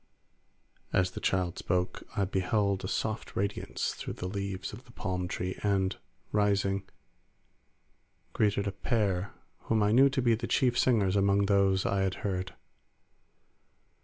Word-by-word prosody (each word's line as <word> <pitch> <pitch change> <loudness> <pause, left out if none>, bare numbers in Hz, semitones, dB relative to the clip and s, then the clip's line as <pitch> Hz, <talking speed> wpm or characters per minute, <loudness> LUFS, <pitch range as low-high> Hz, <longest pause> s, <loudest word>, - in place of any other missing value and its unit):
As 90 0 +2
the - - -6
child 90 -2 0
spoke, 90 0 -1 0.2
I 100 - +3
beheld 100 +1 0
a - - -2
soft 110 +3 -3
radiance 100 +1 -2
through - - -6
the 90 - -4
leaves 100 0 -4
of 120 +5 -10
the 120 - -16
palm 90 -5 -3
tree, 90 +1 -4
and 95 -2 +1 0.4
rising, 100 -2 +1 1.4
greeted 105 -1 +1
a 100 - -1
pair 100 -3 0 0.3
whom 110 -2 +2
I 105 - +3
knew 135 +4 +6
to 135 0 -1
be 120 -1 +4
the 115 +1 -2
chief 125 -2 +2
singers 105 -7 +3
among 100 0 +3
those 100 -1 +3
I 100 -1 +1
had 95 -1 0
heard. 95 -2 -2
100 Hz, 145 wpm, -30 LUFS, 95-105 Hz, 1.4 s, knew